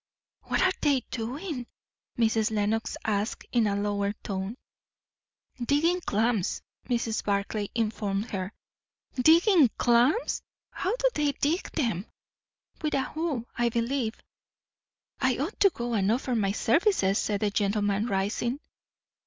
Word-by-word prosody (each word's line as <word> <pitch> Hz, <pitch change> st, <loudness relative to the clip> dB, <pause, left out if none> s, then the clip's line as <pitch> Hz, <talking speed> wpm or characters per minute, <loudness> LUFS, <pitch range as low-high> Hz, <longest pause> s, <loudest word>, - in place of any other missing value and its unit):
"What -, -, +1 dB
are 375 Hz, -, +4 dB
they 285 Hz, -4 st, +3 dB
doing?" 255 Hz, -, -4 dB, 0.5 s
Mrs. 225 Hz, -1 st, +2 dB
Lenox 215 Hz, +1 st, -1 dB
asked, 210 Hz, +1 st, -1 dB
in 235 Hz, -3 st, +3 dB
a 200 Hz, -, 0 dB
lower 200 Hz, 0 st, 0 dB
tone. 195 Hz, +3 st, -4 dB, 1.1 s
"Digging 325 Hz, +8 st, +2 dB
clams," 220 Hz, -, 0 dB, 0.3 s
Mrs. 235 Hz, -3 st, 0 dB
Barclay 200 Hz, +1 st, -1 dB
informed 215 Hz, -1 st, -1 dB
her. 190 Hz, -1 st, -3 dB, 0.6 s
"Digging 320 Hz, -, +5 dB
clams! 245 Hz, -, +3 dB, 0.3 s
How 385 Hz, +5 st, -1 dB
do -, -, +2 dB
they 295 Hz, -1 st, +1 dB
dig 310 Hz, +7 st, -1 dB
them?" 225 Hz, -, -1 dB, 0.7 s
"With 305 Hz, -1 st, 0 dB
a 270 Hz, -, +2 dB
hoe, 295 Hz, -6 st, -3 dB
I 240 Hz, -1 st, +2 dB
believe." 235 Hz, 0 st, -1 dB, 1.0 s
"I 260 Hz, -2 st, +2 dB
ought 310 Hz, +10 st, -3 dB
to 395 Hz, -, +7 dB
go 240 Hz, -7 st, -4 dB
and 200 Hz, -2 st, +2 dB
offer 250 Hz, +2 st, 0 dB
my 205 Hz, -4 st, +1 dB
services," 225 Hz, -, +2 dB
said 205 Hz, -2 st, -1 dB
the 210 Hz, -1 st, +1 dB
gentleman, 205 Hz, +1 st, +1 dB
rising. 215 Hz, +6 st, -1 dB
230 Hz, 130 wpm, -28 LUFS, 205-280 Hz, 1.1 s, to